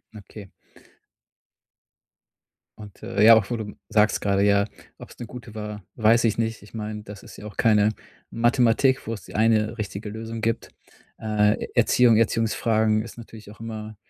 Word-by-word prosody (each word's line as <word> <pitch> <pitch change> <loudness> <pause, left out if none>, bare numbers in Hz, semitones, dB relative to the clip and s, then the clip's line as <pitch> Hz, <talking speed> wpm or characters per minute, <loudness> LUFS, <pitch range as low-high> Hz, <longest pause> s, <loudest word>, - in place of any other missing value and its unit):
Okay. 100 -1 -12 2.3
Und, 105 -2 -13
äh, 105 - 0
ja, 115 +1 +9
auch 105 -1 +1
wo 120 - -1
du 105 -2 -7
sagst 105 -1 +2
grade: 100 -1 +1
„Ja, 100 0 +3 0.3
ob's - - -13
'ne 120 - -7
gute 120 -2 -11
war“, 105 -1 -7
weiß 115 +1 +3
ich 115 -1 +1
nicht. 115 -2 -2
Ich 105 - -17
meine, 105 -1 -6
das 105 -1 -11
ist - - -13
ja - - -11
auch 105 - -9
keine 105 -2 +4 0.4
Mathematik, 120 +3 +2
wo's 110 -4 -5
die - - -13
eine 110 +1 +2
richtige 105 0 -5
Lösung 115 +1 -7
gibt. 115 +1 -2 0.5
Äh, 105 -1 +1
Erziehung 120 -3 +4
Erziehungsfragen 110 -1 +1
ist 115 - -11
natürlich 110 -3 -12
auch 105 - -16
immer 110 -1 -7
110 Hz, 160 wpm, -24 LUFS, 105-115 Hz, 2.3 s, ja